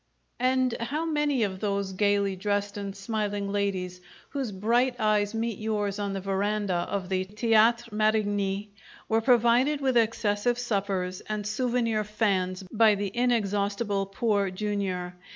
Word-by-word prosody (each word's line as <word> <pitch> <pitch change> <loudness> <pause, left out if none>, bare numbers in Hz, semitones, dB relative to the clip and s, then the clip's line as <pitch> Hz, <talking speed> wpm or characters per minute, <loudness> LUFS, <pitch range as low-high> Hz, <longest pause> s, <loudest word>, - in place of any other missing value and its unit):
And 255 -1 +2
how 290 +8 -2
many 295 -5 +1
of 190 -2 -2
those 200 -2 -1
gaily 200 0 +1
dressed 205 +1 -1
and 200 -1 -5
smiling 205 -1 -2
ladies 185 -3 -2 0.3
whose 270 -6 -3
bright 240 +6 +1
eyes 215 -1 +1
meet 225 -2 -2
yours 210 -2 -1
on 200 -1 -2
the 195 - -2
veranda 200 +1 -1 0.2
of 195 -2 -2
the 185 0 0
Theatre 225 +3 +3
Marigny 205 -2 +1 0.4
were 225 0 +2
provided 245 +4 +4
with 265 -2 0
excessive 230 0 +1
suppers 195 -6 -2
and 210 -1 -2
souvenir 230 0 0
fans 195 -3 0
by 220 -1 +5
the 200 -1 -3
inexhaustible 205 -3 0
Poor 200 -1 0
Jr.! 190 -2 -2
210 Hz, 135 wpm, -27 LUFS, 200-230 Hz, 0.4 s, by